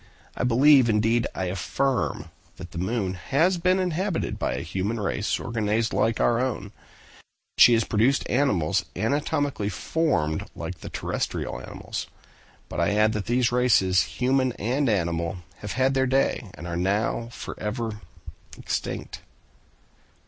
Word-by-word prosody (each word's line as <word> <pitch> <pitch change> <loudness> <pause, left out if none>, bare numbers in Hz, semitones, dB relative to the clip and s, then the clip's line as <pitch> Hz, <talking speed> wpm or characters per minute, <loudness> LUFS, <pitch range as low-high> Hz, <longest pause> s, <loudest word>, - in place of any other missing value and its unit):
I - - -2
believe, 130 +1 +5
indeed 110 +2 +2
I 95 - -2
affirm, 125 +9 -1 0.2
that 90 -2 -10
the 85 - -5
moon 95 0 -1
has 160 - +1
been 185 +2 +3
inhabited 185 0 -1
by - - -1
a - - -3
human 100 +5 -2
race 105 +1 -1
organized 110 -1 -1
like 115 0 +1
our 120 -1 +3
own; 115 -6 -2
that - - -24
she 120 - +9
has 115 -1 +3
produced 115 +7 +1
animals 100 - +1
anatomically 140 +1 0
formed 90 - -1
like - - -6
the - - -8
terrestrial - - -3
animals: - - -6 0.6
but - - -5
I 85 +4 +2
add 110 +1 +3
that 105 -2 -3
these 120 0 +2
races, 110 -7 +4 0.2
human 130 0 +2
and 125 +6 0
animal, 85 -3 0 0.2
have - - -6
had 130 +3 +2
their 130 0 +2
day, 130 -4 +1
and 85 - -9
are 85 -1 -4
now 100 +6 0
forever 110 -1 -5 0.6
extinct!" - - -4
115 Hz, 140 wpm, -25 LUFS, 100-130 Hz, 0.6 s, she